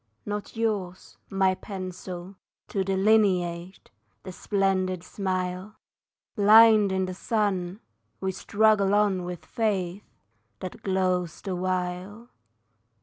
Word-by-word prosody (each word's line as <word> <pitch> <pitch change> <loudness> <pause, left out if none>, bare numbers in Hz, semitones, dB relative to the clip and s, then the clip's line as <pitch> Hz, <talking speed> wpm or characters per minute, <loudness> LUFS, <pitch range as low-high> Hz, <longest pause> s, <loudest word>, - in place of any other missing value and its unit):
Not 205 +1 -5
yours, 200 -5 -3
my 190 -1 +2
pencil, 185 -1 -7 0.3
to 195 - -1
delineate 190 - +1 0.3
The 185 - -7
splendid 185 -2 0
smile! 185 +1 -3 0.6
Blind 215 -1 +7
in 190 0 0
the 185 - -5
sun, 195 -1 -1 0.4
we 190 0 -1
struggle 205 +1 +2
on 200 -4 +2
with 175 -2 -7
Fate 200 -4 -2 0.6
That 185 - -7
glows 185 -3 0
the 190 -3 -3
while. 185 +5 -3
190 Hz, 100 wpm, -26 LUFS, 185-205 Hz, 0.6 s, Blind